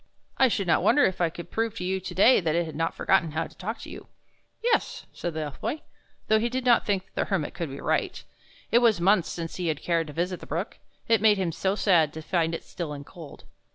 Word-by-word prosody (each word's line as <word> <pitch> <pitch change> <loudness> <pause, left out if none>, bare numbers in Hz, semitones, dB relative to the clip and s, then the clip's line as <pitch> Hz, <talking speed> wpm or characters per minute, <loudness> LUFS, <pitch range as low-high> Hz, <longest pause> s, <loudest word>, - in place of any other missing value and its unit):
" - - -45
I 265 - +6
should 205 -5 -1
not 165 -2 +3
wonder 290 - +4
if 185 -1 +1
I 170 - +3
could 170 +1 -10
prove 225 -1 -1
to - - -4
you 190 +1 -1
to 190 - -7
day 230 +7 +6
that 160 -3 0
it 170 0 +1
has 160 - -7
not 165 +2 -2
forgotten 160 -2 +2
how 160 +1 -1
to - - -14
talk 220 +5 -5
to - - -9
you." - - -10 0.6
"Yes," 470 -1 0
said 175 -2 -5
the 160 - -2
Elf 145 -3 -6
Boy, 305 - -3 0.4
though 220 0 +4
he 235 +2 0
did 255 +1 -3
not 240 -2 +4
think 195 -2 -2
the - - -1
Hermit - - -2
could - - -4
be - - -7
right. - - -1 0.5
It 235 - +6
was 230 -6 +3
months 190 0 +3
since 165 -1 -5
he 180 -2 -2
had 155 -2 -2
cared 165 -2 0
to 150 - -8
visit 175 +3 -2
the - - -11
brook, 170 +8 -4 0.3
it 225 -3 +3
made 215 -2 +5
him 185 -3 -1
so 190 +4 -1
sad 170 -8 +3
to 160 - -7
find 165 -1 0
it - - -7
still 165 -4 -6
and 145 -1 -8
cold. 160 -5 -12
180 Hz, 260 wpm, -26 LUFS, 165-215 Hz, 0.6 s, I